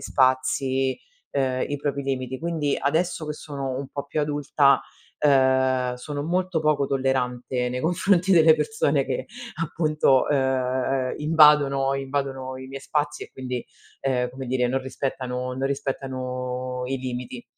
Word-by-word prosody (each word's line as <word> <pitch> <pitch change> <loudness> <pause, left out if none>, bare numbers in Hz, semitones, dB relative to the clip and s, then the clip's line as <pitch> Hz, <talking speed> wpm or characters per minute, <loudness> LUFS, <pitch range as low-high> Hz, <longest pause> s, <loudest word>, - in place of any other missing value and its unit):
spazi, 130 0 +1 0.3
ehm, 130 -2 0
i 145 - -2
propri 140 -1 -2
limiti. 130 -1 -3
Quindi 160 -4 -1
adesso 160 +3 0
che 150 - -2
sono 140 -3 -5
un 135 0 -5
po' 140 0 -5
più 145 +2 -2
adulta, 145 -2 +3 0.4
ehm, 130 -3 +3
sono 145 +3 -5
molto 180 +1 0
poco 150 -2 +2
tollerante 125 -2 -1
nei 125 +1 -3
confronti 180 +4 +2
delle 165 -3 +7
persone 150 -4 +1
che - - -3 0.3
appunto, 155 -4 +2
ehm, 130 -1 0
invadono 150 -3 +5
invadono 135 -1 -3
i 130 - -8
miei 135 +1 -7
spazi 150 +1 -2
e - - -16
quindi, 125 -2 -4 0.4
ehm, 125 -2 0
come 130 +1 -7
dire 125 0 +1
non 135 +2 0
rispettano 130 -1 -3
non 135 +1 -1
rispettano 130 -2 -3
i 135 +1 -1
limiti. 125 -1 -5
135 Hz, 140 wpm, -24 LUFS, 130-145 Hz, 0.4 s, delle